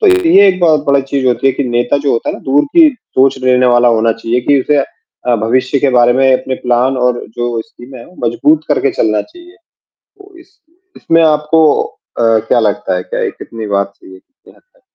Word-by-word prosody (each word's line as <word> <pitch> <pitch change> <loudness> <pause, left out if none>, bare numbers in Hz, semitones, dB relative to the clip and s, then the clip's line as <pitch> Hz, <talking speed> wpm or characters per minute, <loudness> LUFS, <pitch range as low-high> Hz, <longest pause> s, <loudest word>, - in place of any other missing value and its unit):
तो 435 - +2 0.2
ये 200 -11 +6
एक 185 -1 0
बहुत 155 -4 +2
बड़ा 140 0 +3
चीज़ 135 -2 0
होती 125 +1 0
है 135 - +3
कि, 135 - -3
नेता 120 +2 0
जो 140 -1 -1
होता 115 - -2
है - - -6
ना - - -14
दूर 145 +2 +3
की 325 -2 +7
सोच 135 - -1
लेने 125 0 +3
वाला 120 0 +3
होना 115 0 +1
चाहिए 115 +2 -3
कि 140 -1 +4
उसे 150 +2 0 0.5
अ, 125 - +2
भविष्य 130 +5 0
के 140 - +1
बारे 120 -1 +3
में 130 +1 +2
अपने 130 0 -1
प्लान 125 +2 +1
और 125 -1 -1
जो 120 -1 -2
स्कीमें 130 -2 -14
हैं, - - -13 0.2
मजबूत 150 +7 +1
करके 140 -2 +1
चलना 105 -1 0
चाहिए। 350 +2 -17 0.4
तो 400 -2 -21
इस 375 +3 -23 0.4
इसमें 165 0 +1
आपको 155 0 +2 0.2
अ, - - -12 0.6
क्या - - +2
लगता 100 -3 -1
है? 90 - -3
क्या - - -5
ये - - -1
कितनी 115 -1 -9
बात 100 -1 -2
सही - - -16
है - - -14
कि 275 - -34 0.2
क्या - - -22
है? - - -30
130 Hz, 220 wpm, -13 LUFS, 120-150 Hz, 0.6 s, की